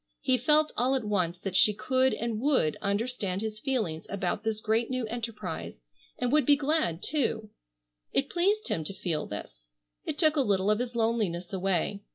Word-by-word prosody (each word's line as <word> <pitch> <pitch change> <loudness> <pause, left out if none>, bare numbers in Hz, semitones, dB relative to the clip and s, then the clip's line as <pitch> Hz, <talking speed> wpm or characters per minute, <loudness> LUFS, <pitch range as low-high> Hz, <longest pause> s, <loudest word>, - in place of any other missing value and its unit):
He 260 - +3
felt 300 +4 +3
all 255 +3 +2
at 260 - -1
once 180 -5 0
that 185 +1 -5
she 210 +2 +5
could 260 +4 +2
and 230 -2 -3
would 260 - +2
understand 200 -2 -1
his 215 -1 -4
feelings 215 - -2
about 195 +1 -2
this 220 -1 -1
great 220 +2 +1
new 255 -2 -1
enterprise, 220 - -5 0.4
and 245 -1 0
would 300 0 +4
be 285 +3 +6
glad 280 - 0
too. 230 -7 -1 0.6
It 275 - +1
pleased 400 +7 +1
him 160 - -1
to 195 - -6
feel 160 -6 -2
this. - - -8 0.4
It - - -4
took 310 -2 +3
a - - +5
little 200 -4 +2
of 215 - +2
his 245 -1 -3
loneliness 215 -7 0
away. 195 +1 0
220 Hz, 185 wpm, -29 LUFS, 190-260 Hz, 0.6 s, be